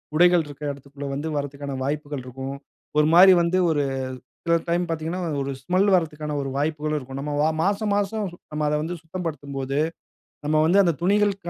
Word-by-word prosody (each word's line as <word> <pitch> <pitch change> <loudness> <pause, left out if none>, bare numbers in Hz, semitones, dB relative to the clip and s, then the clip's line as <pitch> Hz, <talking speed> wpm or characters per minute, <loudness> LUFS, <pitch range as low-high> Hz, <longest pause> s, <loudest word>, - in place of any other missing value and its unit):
உடைகள் 175 +1 +5
இருக்கிற 145 0 -6
இடத்திற்குள்ள 140 0 -8
வந்து 145 +3 -3
வருவதற்கான 140 -1 -4
வாய்ப்புகள் 145 0 -3
இருக்கும். 135 +2 -6 0.4
ஒரு 150 - +4
மாதிரி 185 +2 +9
வந்து 170 +2 +1
ஒரு 150 -3 +2 0.6
சில 170 0 +4
டைம் 175 +1 +1
பார்த்தீங்கனா 165 +2 -3 0.2
ஒரு 140 0 -2
ஸ்மெல் 185 +7 +2
வருவதற்கான 150 -3 -1
ஒரு 135 - -3
வாய்ப்புகளும் 150 +1 -1
இருக்கும். 135 0 -7
நம்ம 145 +2 +1
மாசம் 205 +2 +1
மாசம் 205 +1 0 0.3
நம்ம 150 0 -1
அத - - 0
வந்து 170 +3 -3
சுத்தப்படுத்தும்போது, 145 -5 -4 0.7
நம்ம 155 +1 +3
வந்து 180 +5 +4
அந்த 170 -2 +2
துணிகள் 205 +2 +3
155 Hz, 160 wpm, -24 LUFS, 140-175 Hz, 0.7 s, மாதிரி